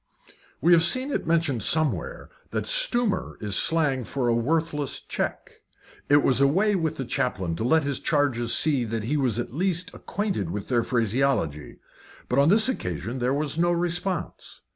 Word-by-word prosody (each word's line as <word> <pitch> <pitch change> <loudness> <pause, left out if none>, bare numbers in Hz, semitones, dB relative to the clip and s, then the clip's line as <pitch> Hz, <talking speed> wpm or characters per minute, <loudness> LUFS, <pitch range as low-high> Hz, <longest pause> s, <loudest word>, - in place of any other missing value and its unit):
We 170 - +3
have 165 - +6
seen 255 - +2
it - - -3
mentioned 160 -7 +1
somewhere 160 - 0 0.2
that - - -3
"stumer" 245 - +1
is 105 -3 -3
slang 150 - +2
for 125 +2 -2
a 120 - +2
worthless 150 +3 -1
cheque. - - -5 0.6
It 145 0 +5
was 130 0 +2
a 140 - +5
way 195 +9 +2
with 160 -4 -1
the 135 - -5
chaplain 95 -8 -2
to - - -3
let 160 +6 +2
his 140 -2 -2
charges 125 -6 0
see 145 -5 +3
that 115 -1 -4
he 130 +7 -2
was 130 -7 0
at 120 -1 -4
least 185 +3 -2
acquainted 200 - -3
with 100 +3 -6
their 120 -2 +2
phraseology. 115 - -1 0.5
But 125 - +1
on 140 +3 +4
this 215 +4 +6
occasion 130 - -3
there 125 +1 0
was 150 +1 -2
no 175 +1 +2
response. 175 +1 -3
145 Hz, 175 wpm, -25 LUFS, 120-170 Hz, 0.6 s, have